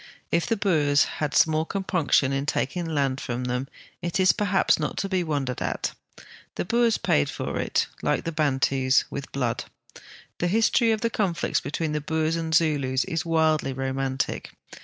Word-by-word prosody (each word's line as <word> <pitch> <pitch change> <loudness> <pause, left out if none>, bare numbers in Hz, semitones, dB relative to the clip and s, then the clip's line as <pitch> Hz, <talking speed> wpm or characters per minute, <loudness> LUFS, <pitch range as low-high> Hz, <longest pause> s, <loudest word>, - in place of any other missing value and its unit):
If 170 - +1
the 230 - +1
Boers 150 -8 +3 0.2
had 150 -2 -1
small 160 -1 +4
compunc 180 -3 -2
tion 135 -1 +4
in 135 +1 -2
taking 170 +5 -1
land 140 -4 0
from 120 +1 -3
them, 125 +2 -2 0.3
it 175 +2 -2
is 185 0 +6
perhaps 200 -3 +2
not - - -3
to 195 - -1
be 185 -2 +1
wondered 140 -6 -2
at. - - -2 0.6
The - - -2
Boers 235 +3 +2
})aid 70 - +3
for - - -4
it, - - +1 0.2
like - - 0
the 165 - -3
Bantus, 135 -3 +2
with 140 -1 -6
blood. 125 -4 -2 0.7
The 175 - +1
history 225 +4 +3
of 220 -1 0
the 230 -1 0
conflicts 180 -6 0
between 155 +1 -3
the 150 0 -1
Boers 160 +2 0
and 165 -1 -3
Zulus 140 -5 +2
is 170 -2 -3
wildly 160 -4 +2
romantic. 135 0 -2
155 Hz, 175 wpm, -25 LUFS, 135-175 Hz, 0.7 s, is